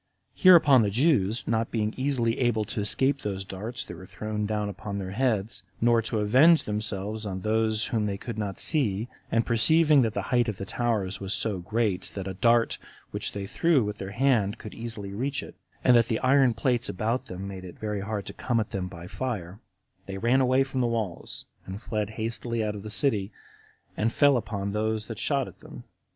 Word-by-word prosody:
Hereupon 160 -8 +7
the 105 - +2
Jews, 115 - +2
not 115 0 0
being 110 -2 -1
easily 130 -4 0
able 120 -4 +1
to 105 - -5
escape 135 +7 +1
those 95 -2 -3
darts 105 +6 -5
that - - -8
were 95 +2 -11
thrown 105 +1 -3
down 105 -1 -1
upon 100 0 -5
their 95 -1 -4
heads, 110 -2 -1 0.2
nor 120 0 +4
to 110 0 -3
avenge 130 +11 +5
themselves 105 0 -3
on 95 -3 -4
those 110 +1 +1
whom 110 -2 +1
they 100 -1 -2
could 115 +2 -6
not 100 -3 -3
see, 115 -6 0 0.2
and 115 0 +2
perceiving 150 +6 +4
that 110 -2 0
the - - -1
height 120 -1 +3
of 105 -3 -3
the 95 - -5
towers 105 -4 -1
was 95 +1 -1
so 100 -2 0
great, 100 0 0
that 95 -1 -4
a 95 - -3
dart 115 +4 +2 0.3
which - - -3
they 100 -1 -4
threw 150 +5 +2
with 105 0 -4
their 95 - -5
hand 110 -3 +1
could 110 - -9
hardly 110 -4 -6
reach 135 +7 -2
it, - - -10 0.3
and 125 - +6
that 115 -1 +5
the 110 - 0
iron 130 -2 +4
plates 120 0 0
about 110 +6 -2
them 95 +2 -6
made 95 -1 -7
it 90 -2 -10
very 105 -2 -3
hard 100 -1 -4
to - - -7
come 120 -2 -1
at 110 - -3
them 95 -2 -3
by 85 -2 -9
fire, 100 -3 -4 0.5
they 95 0 -5
ran 120 +6 +3
away 130 +1 +3
from 130 -1 -3
the 120 - +2
walls, 110 -7 -3 0.2
and 95 +2 -6
fled 105 -2 -3
hastily 115 0 -2
out 105 -1 -1
of 105 - -7
the 110 - -7
city, 105 -4 +1 0.6
and 110 +2 0
fell 145 +2 +4
upon 100 -4 -2
those 110 +1 -1
that - - -7
shot - - +1
at - - -13
them. - - -11
110 Hz, 210 wpm, -27 LUFS, 100-120 Hz, 0.6 s, Hereupon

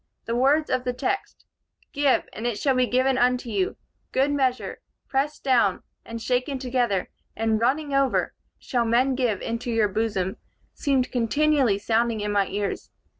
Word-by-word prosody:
The 230 - -2
words 280 +5 +2
of 255 -1 +1
the 250 - -1
text, 265 +10 -3 0.5
'Give, 285 -2 +2
and 230 - -3
it 235 -4 -2
shall 270 +3 +2
be 255 -1 +2
given 255 +1 +2
unto 250 0 +1
you; 195 -3 -1 0.3
good 270 +2 +2
measure, 260 -3 -1 0.3
pressed 280 +2 -1
down, 235 -8 +2 0.2
and 230 0 -7
shaken 250 +4 -1
together, 245 -7 0 0.3
and 220 0 0
running 280 +4 +1
over, 275 -1 +1 0.2
shall 245 -3 -1
men 240 +4 +2
give 245 -6 0
into 230 +1 -3
your 225 -3 +2
bosom,' 195 -2 -1 0.4
seemed 270 -3 0
continually 260 -1 +2
sounding 225 +2 0
in 210 0 -2
my 200 -1 +2
ears. 205 0 -3
250 Hz, 160 wpm, -25 LUFS, 225-270 Hz, 0.5 s, words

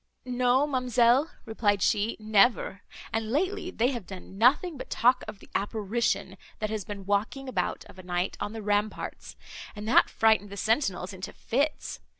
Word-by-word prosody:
"No, 250 +2 +2
ma'amselle," 255 0 +3 0.2
replied 205 -3 +1
she, 210 +2 +1
"never; 215 -2 +2 0.3
and 225 -1 -1
lately 365 - -1
they 245 -8 +1
have 240 -8 -5
done 190 0 -10
nothing 280 - +3
but 260 - -8
talk 250 +2 +3
of - - -7
the - - -17
apparition, 205 -1 -1 0.2
that 215 0 -3
has 215 -2 -2
been 200 -1 -7
walking 210 +7 -1
about 190 -9 -2
of 185 - -15
a - - -10
night 180 +1 -2
on 205 - -3
the 220 -1 -6
ramparts, 205 +1 -2 0.4
and 210 +1 -6
that 235 - +5
frightened 220 -2 +3
the 200 - -8
sentinels 200 -5 0
into 185 0 -7
fits. 285 +6 -2
220 Hz, 165 wpm, -28 LUFS, 200-250 Hz, 0.4 s, that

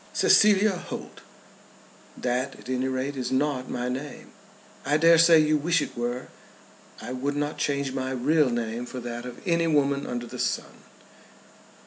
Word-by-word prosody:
"Cecilia 210 0 +5
Holt - - -8 0.5
" - - -26
"That 125 +3 -1
at - - -13
any 130 0 -1
rate 130 +2 -2
is 130 -2 -3
not 130 -1 0
my 125 0 -3
name." 135 +4 -6 0.5
"I 145 +2 +2
dare 165 +1 +6
say 165 0 +7
you 155 0 +3
wish 165 +3 +1
it - - -4
were." 120 +1 -3 0.7
"I - - -7
would 135 +3 -2
not 145 +1 -3
change 140 -2 -1
my 130 -1 -3
real 135 +3 +2
name 120 0 -3
for 130 - -6
that 120 0 -6
of 125 - -9
any 170 -1 +2
woman 140 -2 +1
under 120 0 -4
the - - -9
sun." - - -2
135 Hz, 165 wpm, -26 LUFS, 125-150 Hz, 0.7 s, say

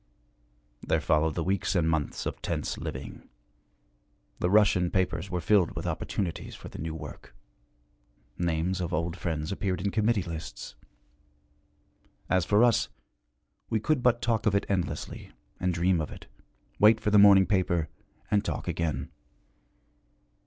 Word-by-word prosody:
There - - +1
followed 75 0 +1
the 85 - -1
weeks 95 +2 0
and 85 -3 +2
months 80 -3 -1
of - - -4
tense - - -3
living. 65 0 -7 1.1
The 90 - +1
Russian 100 -3 +4
papers 90 -1 -1
were 90 -1 -2
filled 95 0 +3
with - - -5
opportunities 90 -5 -3
for - - -10
the - - -10
new 80 +1 -4
work; 75 -2 -10 1.0
names 85 +2 -1
of 85 - -2
old 85 +2 -2
friends 80 -3 -3
appeared 95 -2 -2
in 100 +2 -1
committee 110 -1 +1
lists. 80 -8 -7 1.6
As 95 -2 +3
for 105 +3 +4
us, 120 -2 +3 0.8
we 110 - +1
could 145 +4 +1
but 120 -1 +2
talk 115 -1 +1
of 100 - +3
it 100 - +1
endlessly, 95 -3 -3 0.3
and 90 - +1
dream 85 0 +2
of 75 - -4
it, - - -10 0.5
wait 110 +1 +6
for 105 - -1
the 105 - +6
morning 100 -1 +8
paper, 90 -5 +1 0.4
and 100 -1 +3
talk - - -4
again. 85 -3 -2
90 Hz, 145 wpm, -28 LUFS, 80-100 Hz, 1.6 s, morning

